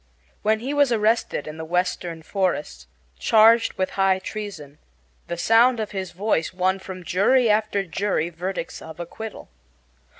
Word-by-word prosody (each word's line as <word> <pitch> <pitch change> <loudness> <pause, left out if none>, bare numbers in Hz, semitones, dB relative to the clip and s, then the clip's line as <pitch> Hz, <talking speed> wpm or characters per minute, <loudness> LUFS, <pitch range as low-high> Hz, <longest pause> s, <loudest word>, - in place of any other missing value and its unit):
When 220 +1 +1
he 270 +4 -3
was 285 -3 +3
arrested 220 -7 +1
in 155 +1 -7
the 160 - -5
Western 175 -1 -2
forests, 160 - -2 0.3
charged 225 +1 +5
with 185 - -2
high 190 -1 +4
treason, 185 -8 -7 0.5
the 170 - -4
sound 230 +6 +4
of 215 -1 -3
his 190 -2 -4
voice 185 -3 -1
won 185 +1 0
from 185 -1 -8
jury 215 +7 +3
after 210 -2 +1
jury 190 -2 -1
verdicts 180 +1 -5
of 160 +1 -10
acquittal. 215 +6 -8
190 Hz, 145 wpm, -23 LUFS, 170-220 Hz, 0.5 s, charged